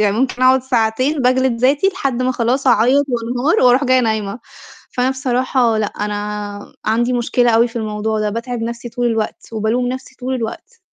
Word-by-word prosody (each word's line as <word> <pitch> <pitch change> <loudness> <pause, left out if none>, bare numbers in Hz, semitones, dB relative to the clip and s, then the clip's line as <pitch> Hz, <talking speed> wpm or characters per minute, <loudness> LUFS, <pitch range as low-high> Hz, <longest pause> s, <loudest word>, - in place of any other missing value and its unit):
يعني 210 0 +2
ممكن 255 0 -1
أقعُد 255 0 +5
ساعتين 255 +4 0
باجلد 255 -1 +2
ذاتي 285 +8 +3
لحد 275 -10 -2
ما 255 0 +1
خلاص 250 +3 0
أعيّط 250 +4 +4
وأنهار 245 +5 0
وأرُوح 250 +3 +4
جاية 255 -1 +4
نايمة. 220 -2 -1 0.5
فأنا 250 +1 +1
بصراحة 255 -3 +1
لأ، 215 - 0
أنا 205 0 -5
عندي 240 +3 +1
مشكلة 245 0 +2
أوي 230 +1 +4
في 235 - -11
الموضوع 215 0 -2
ده، 210 0 0
باتعِب 235 +2 -4
نَفْسي 235 +1 -5
طول 245 +1 -2
الوقت، 225 -2 -2
وبالوم 225 +3 0
نَفْسي 260 +1 -7
طول 255 +1 -2
الوقت. 255 - -6
245 Hz, 175 wpm, -18 LUFS, 220-255 Hz, 0.5 s, أقعُد